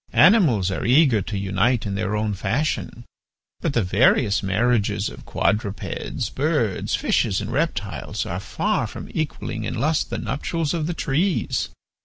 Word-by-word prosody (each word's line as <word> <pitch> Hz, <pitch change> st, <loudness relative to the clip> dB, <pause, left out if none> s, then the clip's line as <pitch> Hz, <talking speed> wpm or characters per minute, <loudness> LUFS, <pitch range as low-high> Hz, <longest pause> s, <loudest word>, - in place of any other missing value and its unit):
Animals 140 Hz, -, +5 dB
are 95 Hz, -, -3 dB
eager 130 Hz, -3 st, +4 dB
to 100 Hz, +2 st, -4 dB
unite 100 Hz, +5 st, +1 dB
in 100 Hz, -, -2 dB
their 100 Hz, +1 st, -1 dB
own 105 Hz, 0 st, 0 dB
fashion, 115 Hz, +10 st, -2 dB, 0.5 s
but 160 Hz, -, -1 dB
the 115 Hz, -, +2 dB
various 100 Hz, +2 st, +3 dB
marriages 105 Hz, +3 st, +1 dB
of -, -, -12 dB
quadrupeds, 105 Hz, -1 st, -2 dB
birds, -, -, 0 dB
fishes, 95 Hz, -, +1 dB
and 105 Hz, +2 st, -5 dB
reptiles 105 Hz, -, -2 dB
are -, -, -3 dB
far -, -, -1 dB
from -, -, -9 dB
equalling 135 Hz, -7 st, -3 dB
in -, -, -3 dB
lust 155 Hz, +2 st, 0 dB
the -, -, -3 dB
nuptials 145 Hz, +7 st, -2 dB
of 160 Hz, -3 st, -1 dB
the 175 Hz, -, -2 dB
trees. 165 Hz, +6 st, 0 dB
115 Hz, 150 wpm, -23 LUFS, 100-150 Hz, 0.5 s, Animals